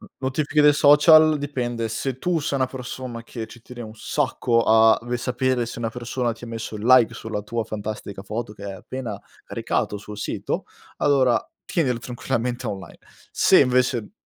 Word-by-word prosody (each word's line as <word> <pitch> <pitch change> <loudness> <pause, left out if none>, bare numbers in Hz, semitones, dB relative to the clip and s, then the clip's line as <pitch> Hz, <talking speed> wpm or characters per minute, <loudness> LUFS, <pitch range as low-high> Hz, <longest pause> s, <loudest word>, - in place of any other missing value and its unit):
N - - -13
notifiche 145 +3 +1
dei 150 0 +7
social 155 +2 +6
dipende 120 -5 -3
se 125 +3 -3
tu 175 +3 0
sei 145 -2 -2
una 130 -1 +1
persona 125 -2 -7
che 115 -1 -6
ci 120 - -13
tieni 120 +1 -11
un 110 -2 -8
sacco 125 -2 0
a 110 0 +6
ve 120 0 -2
sapere 125 0 0
se 120 - -7
una 115 - -1
persona 120 +1 -2
ti 115 - -11
ha - - -9
messo 115 -1 -6
il 105 - -7
like 125 -2 +6
sulla 110 -2 -5
tua 115 +2 -3
fantastica 105 -2 -6
foto 105 +2 -5
che 105 - -14
hai 100 -1 -5
appena 110 +2 -6 0.2
caricato 105 - -2
sul 105 +1 -9
sito, 105 - -3 0.3
allora 130 -4 +3 0.3
tienile 130 -8 0
tranquillamente 125 0 -3
online. 95 -2 -7 0.3
Se - - +5
invece 125 - +1
120 Hz, 175 wpm, -23 LUFS, 110-130 Hz, 0.3 s, dei